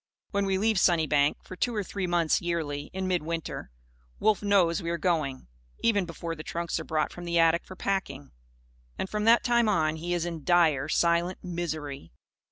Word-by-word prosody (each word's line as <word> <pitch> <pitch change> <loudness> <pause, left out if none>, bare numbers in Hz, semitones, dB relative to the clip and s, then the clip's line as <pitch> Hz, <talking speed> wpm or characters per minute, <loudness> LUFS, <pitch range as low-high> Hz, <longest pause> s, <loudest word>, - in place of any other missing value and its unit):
When 200 -1 0
we 190 -1 +1
leave 215 0 +2
Sunnybank, 155 -5 +2
for 185 - -9
two 235 +6 -1
or 210 - 0
three 190 0 -4
months, 170 -2 +2
yearly, 150 -4 -3
in 190 0 -3
midwinter, 165 - -3 0.5
Wolf 215 -1 +2
knows 195 -4 +3
we 170 - -3
are 170 - -1
going; 155 -6 -1 0.4
even 205 -5 +2
before 165 0 -5
the 155 - -8
trunks 170 +1 -3
are - - -5
brought 155 -1 -1
from 175 - -9
the 170 0 0
attic 165 0 +4
for 185 - -10
packing. 160 -9 -3 0.7
And, - - -2
from 210 +1 -2
that 230 +1 +6
time 235 -2 +3
on, 160 -5 +1
he 175 +2 -2
is 170 -1 -1
in 165 -3 -5
dire, 160 -5 +3
silent 170 +2 +1
misery. 155 - -5
170 Hz, 185 wpm, -28 LUFS, 160-190 Hz, 0.7 s, that